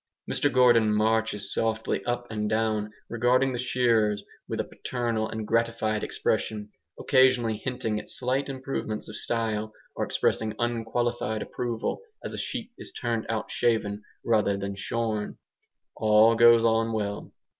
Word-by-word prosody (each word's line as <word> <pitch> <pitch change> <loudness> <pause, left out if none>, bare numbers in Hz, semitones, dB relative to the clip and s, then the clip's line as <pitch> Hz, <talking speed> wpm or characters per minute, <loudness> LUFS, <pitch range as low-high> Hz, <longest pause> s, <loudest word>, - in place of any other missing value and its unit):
Mr - - +1
Gordon 120 -4 +5
marches 110 -2 +1
softly 110 0 -1
up 120 0 -1
and 105 -1 -2
down, 110 -1 0 0.2
regarding 125 +3 +2
the 120 - -3
shearers 115 -4 +2 0.2
with - - -3
a - - +1
paternal 115 -3 -3
and 110 -1 -4
gratified 115 -2 0
expression, 105 -1 -2 0.3
occasionally 130 -5 +3
hinting 115 -2 -2
at - - -10
slight 130 +3 -1
improvements 130 -5 -4
of 110 - -8
style, 110 -1 -2 0.2
or - - -1
expressing 110 -1 0
unqualified 120 -1 -1
approval 120 - -3 0.2
as - - -4
a - - -5
sheep 240 -2 -4
is - - -8
turned 115 -3 -2
out 110 -1 -2
shaven 110 -3 0 0.2
rather 105 -3 +2
than 100 0 -4
shorn. 110 +1 -2 0.6
All 110 +1 +5
goes 115 0 +6
on 115 0 +2
well. 100 -2 -3
115 Hz, 140 wpm, -27 LUFS, 110-120 Hz, 0.6 s, goes